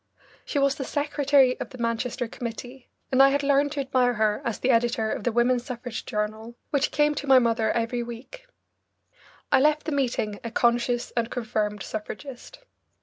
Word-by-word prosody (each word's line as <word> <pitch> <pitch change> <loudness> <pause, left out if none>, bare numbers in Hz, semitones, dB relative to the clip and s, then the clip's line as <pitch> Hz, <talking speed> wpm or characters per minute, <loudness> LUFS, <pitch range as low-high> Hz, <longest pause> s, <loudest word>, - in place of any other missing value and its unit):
She - - -3
was 275 -1 +3
the 275 - -5
secretary 285 -2 +2
of - - -5
the 255 - -11
Manchester 230 +1 -2
committee, 245 +3 -8 0.2
and 260 0 +5
I 275 - +8
had 285 +1 0
learned 280 +1 +2
to 290 - -4
admire 255 -2 +1
her 215 -1 +1
as 230 - -2
the 260 - +1
editor 230 -2 +1
of - - -4
the 240 - +2
Women's 240 +1 +2
Suffrage 245 -2 -6
Journal, 215 +1 -3 0.2
which 285 -1 +1
came 295 0 +2
to 290 0 -5
my 265 -1 +7
mother 230 -2 +2
every 235 +1 -1
week. 240 - -9 1.0
I - - +6
left 300 +2 +3
the 315 - -2
meeting 240 -7 -1
a 230 - -4
conscious 240 +1 +1
and 235 -1 -1
confirmed 215 -4 -2
suffragist. 265 - -8
245 Hz, 180 wpm, -25 LUFS, 230-275 Hz, 1.0 s, I